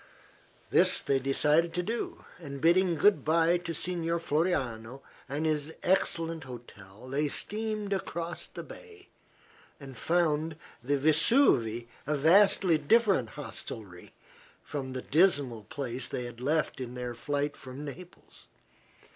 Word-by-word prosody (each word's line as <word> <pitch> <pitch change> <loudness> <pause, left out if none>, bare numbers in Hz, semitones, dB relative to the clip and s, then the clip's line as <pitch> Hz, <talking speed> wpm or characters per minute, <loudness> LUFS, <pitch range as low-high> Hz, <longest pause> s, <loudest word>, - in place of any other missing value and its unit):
This - - +5
they 135 -1 +1
decided 150 +5 +2
to 180 - 0
do, 230 +5 -4
and 140 -5 -7
bidding 175 +3 +3
good 200 +7 +4
bye 165 +2 +3
to 175 -1 -5
Signor 170 0 -2
Floriano 135 -7 -1 0.3
and 145 +3 -2
his 155 0 -1
excellent 165 -4 0
hotel 115 -3 -12
they 145 +3 0
steamed 215 +4 -2
across 170 -3 -4
the - - -8
bay 430 -5 -13 0.7
and 135 -3 -10
found 160 -1 0 0.3
the 140 +3 +1
"Vesuve" 145 - +4 0.2
a 150 - +1
vastly 175 +1 +4
different 190 - +3
hostelry 95 -5 -8 0.5
from 135 -3 -5
the 130 - -5
dismal 140 - +2
place 125 +1 -5
they 125 - -4
had 120 0 -9
left 150 0 0
in 125 0 -6
their 125 -1 -4
flight 145 +4 -2
from 130 +3 -9
Naples. 175 +5 -12
150 Hz, 130 wpm, -29 LUFS, 130-175 Hz, 0.7 s, This